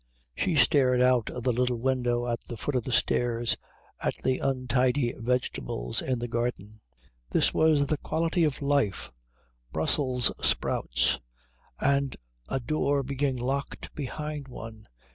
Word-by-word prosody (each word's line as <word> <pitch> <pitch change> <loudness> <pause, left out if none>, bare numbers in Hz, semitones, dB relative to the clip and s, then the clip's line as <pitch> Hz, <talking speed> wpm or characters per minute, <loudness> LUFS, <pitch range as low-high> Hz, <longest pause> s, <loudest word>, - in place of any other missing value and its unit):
She 165 - 0
stared 125 -1 +4
out 125 -2 +3
of 125 - -6
the 125 - +2
little 125 0 +1
window 120 -1 0
at 115 -1 -1
the 120 - -8
foot 145 - -2
of 125 -3 0
the 130 - -3
stairs 120 -1 +2 0.5
at - - 0
the 130 0 +1
untidy 130 -1 +1
vegetables 115 - -2
in 130 -1 -1
the 120 +1 -3
garden. 115 -3 -3 0.5
This - - +2
was 155 -3 +4
the 150 +2 0
quality 165 +1 0
of 150 -2 0
life 140 - +1 0.6
Brussels 125 - +2
sprouts, - - +1 0.6
and 140 -1 +1 0.3
a - - 0
door 140 +1 0
being 135 0 -1
locked 135 +3 -3
behind 150 0 -5
one. 115 -3 -9
125 Hz, 140 wpm, -28 LUFS, 120-140 Hz, 0.6 s, stared